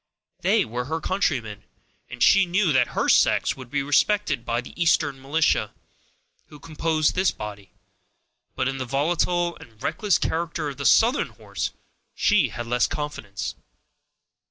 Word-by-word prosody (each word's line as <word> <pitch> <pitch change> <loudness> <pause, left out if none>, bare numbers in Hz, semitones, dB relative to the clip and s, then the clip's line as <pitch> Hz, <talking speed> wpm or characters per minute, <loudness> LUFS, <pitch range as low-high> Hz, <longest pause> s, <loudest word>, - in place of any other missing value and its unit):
They - - +2
were 120 +2 -4
her 160 +4 -3
countrymen, 130 - -1 0.5
and - - -2
she 195 -1 +5
knew 180 -2 +2
that 130 -2 +1
her - - +1
sex - - +3
would 130 -2 -11
be 140 +1 -1
respected 175 - +1
by 120 0 -1
the 125 - -12
Eastern 160 -5 +1
militia, 150 +4 +1 0.7
who 150 - -14
composed 155 0 0
this 185 0 +2
body; 100 -3 -8 0.8
but 130 - 0
in 135 0 -3
the 130 - -3
volatile 170 +6 0
and 110 -2 -16
reckless 205 +2 +1
character 165 -2 -2
of 140 - -8
the 140 - 0
Southern 240 +5 +4
horse - - -5 0.5
she 210 -2 +3
had 120 - -6
less 120 +1 +1
confidence. 110 -10 -5
145 Hz, 150 wpm, -24 LUFS, 125-170 Hz, 0.8 s, she